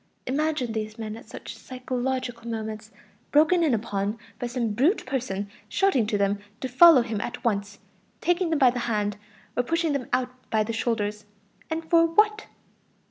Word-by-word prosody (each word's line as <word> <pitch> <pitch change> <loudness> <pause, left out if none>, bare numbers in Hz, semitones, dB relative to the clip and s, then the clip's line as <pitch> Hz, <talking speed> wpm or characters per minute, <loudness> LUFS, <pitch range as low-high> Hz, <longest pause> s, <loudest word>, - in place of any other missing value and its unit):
Imagine 285 -2 0
these 215 -1 -4
men 220 -1 -5
at 225 -1 -13
such - - -8
psychological 255 0 -4
moments, 220 -1 -5 0.4
broken 330 +4 +5
in 290 -7 +3
upon 205 -1 -2 0.2
by 245 - -2
some 240 -2 -1
brutal 280 - +2
person 250 -7 -2 0.2
shouting 280 - +2
to 210 - 0
them 200 0 +1 0.2
to 260 - -3
follow 265 +1 +8
him 225 -3 -3
at 245 0 -5
once, 205 -3 -1 0.4
taking 350 0 +1
them 320 - +2
by 260 -3 +6
the 245 - -3
hand, 210 -2 0 0.4
or - - +3
pushing 325 +4 0
them 270 -4 -2
out 250 0 +1 0.2
by 220 -1 +2
the 230 +2 -4
shoulders. 210 -2 -1 0.4
And 320 0 -3
for 330 0 +5
what? 425 +5 +2
245 Hz, 170 wpm, -26 LUFS, 215-295 Hz, 0.4 s, follow